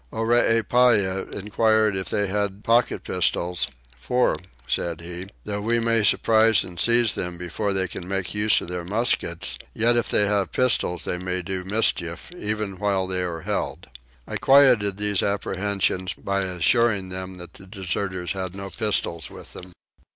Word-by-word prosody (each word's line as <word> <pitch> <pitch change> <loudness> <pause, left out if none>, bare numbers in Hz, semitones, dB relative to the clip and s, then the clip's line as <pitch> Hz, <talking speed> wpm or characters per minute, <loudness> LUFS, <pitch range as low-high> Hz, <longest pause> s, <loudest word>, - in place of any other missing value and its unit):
Oreepyah 115 -3 +2
enquired 110 +1 +1
if 95 -4 -3
they 105 - 0
had 100 +1 -2
pocket 115 +1 +2
pistols 90 0 0 0.3
"for," 125 - +1 0.3
said 85 -2 -2
he, 90 +2 -7 0.2
"though 105 -1 -4
we 115 +3 +1
may 115 -1 +2
surprise 110 0 +4
and 90 -1 -9
seize 120 -1 +3
them 90 -1 -4
before 90 +4 -3
they 95 -1 0
can 90 - -8
make 95 -2 -2
use 105 0 +3
of - - -7
their 90 -1 -4
muskets, 110 +7 0 0.2
yet 120 +1 +3
if 120 - 0
they 105 - +3
have 100 -1 0
pistols 115 -8 +1
they 90 - -3
may 90 0 -3
do 95 +1 -4
mischief, 95 - -1
even 105 - -3
while 100 -2 0
they 95 0 -1
are 85 -2 -4
held." - - -4 0.4
I - - -3
quietened 125 -8 +5
these 105 -2 +1
apprehensions 95 -2 -1
by 100 0 -2
assuring 95 +2 +2
them 95 0 -6
that 90 -1 -9
the 95 - -13
deserters 95 -2 -3
had 95 -1 -4
no 95 0 -7
pistols 100 -7 0
with - - -12
them. 90 0 -10
100 Hz, 160 wpm, -24 LUFS, 90-110 Hz, 0.4 s, quietened